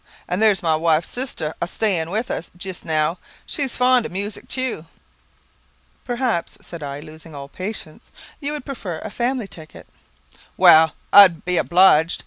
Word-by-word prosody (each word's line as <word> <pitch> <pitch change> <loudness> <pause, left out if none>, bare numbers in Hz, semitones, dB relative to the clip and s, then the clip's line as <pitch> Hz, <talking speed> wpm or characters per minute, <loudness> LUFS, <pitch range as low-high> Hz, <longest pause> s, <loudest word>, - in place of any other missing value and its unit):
Then 180 +2 -2
there's 215 -4 +3
my 160 -2 +2
wife's 160 0 +1
sister 210 - -3
a 170 - -1
staying 180 -5 0
with 220 +6 -2
us 165 - -5
jist 185 0 -6
now; 160 +2 0 0.3
she's 275 -4 -1
very 250 - +2
fond 250 -2 +4
of - - -15
music 200 +3 -4
tew." 255 -11 -3 1.2
"Perhaps," 240 -8 -2
said 170 -2 -9
I, 140 0 -6
losing 160 0 -12
all 140 -1 -8
patience, 185 - -6 0.3
"you 290 -1 -3
would 295 -4 -6
prefer 205 - -6
a 215 - -7
family 240 -1 -2
ticket?" 155 -4 -12 0.7
"Well; 160 0 +6 0.2
I'd 190 -5 +7
be 180 0 +1
obliged. 175 -2 +4
180 Hz, 160 wpm, -21 LUFS, 160-225 Hz, 1.2 s, I'd